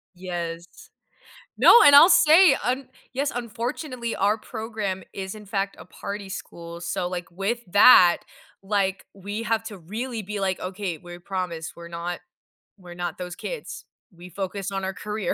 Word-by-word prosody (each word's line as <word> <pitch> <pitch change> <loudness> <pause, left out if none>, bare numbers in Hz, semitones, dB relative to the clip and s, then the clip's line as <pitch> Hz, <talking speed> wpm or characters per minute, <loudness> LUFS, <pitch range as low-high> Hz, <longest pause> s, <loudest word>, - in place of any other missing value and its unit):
Yes. 175 -1 -5 0.9
No, 470 - +8
and 285 - +8
I'll 330 +6 +9
say, 320 -2 +7
un 255 +1 -1 0.3
yes, 280 +2 -1
unfortunately, 240 +1 -4
our 205 +2 +2
program 220 -4 -5
is 190 +1 -6
in 210 -1 -11
fact 200 -1 -2
a - - -11
party 200 -1 -7
school, 170 -2 -8
so, 175 +1 -2
like, 175 -1 -5
with 200 +7 -2
that 185 -4 +7 0.4
like, 195 -1 -1
we 205 +3 -6
have 225 0 0
to 210 -3 -8
really 220 +7 -5
be, 205 0 -5
like, 190 -1 -1
"Okay, 185 -2 -4
we 175 +2 -11
promise 175 -3 -5
we're 170 0 -9
not 170 +1 -5 0.6
we're 180 -2 -12
not 175 -2 -4
those 180 -1 -6
kids, - - -7 0.3
we 175 +1 -12
focus 195 +2 -4
on 195 0 -3
our 190 0 -2
career." 210 -3 -3
195 Hz, 160 wpm, -24 LUFS, 180-225 Hz, 0.9 s, I'll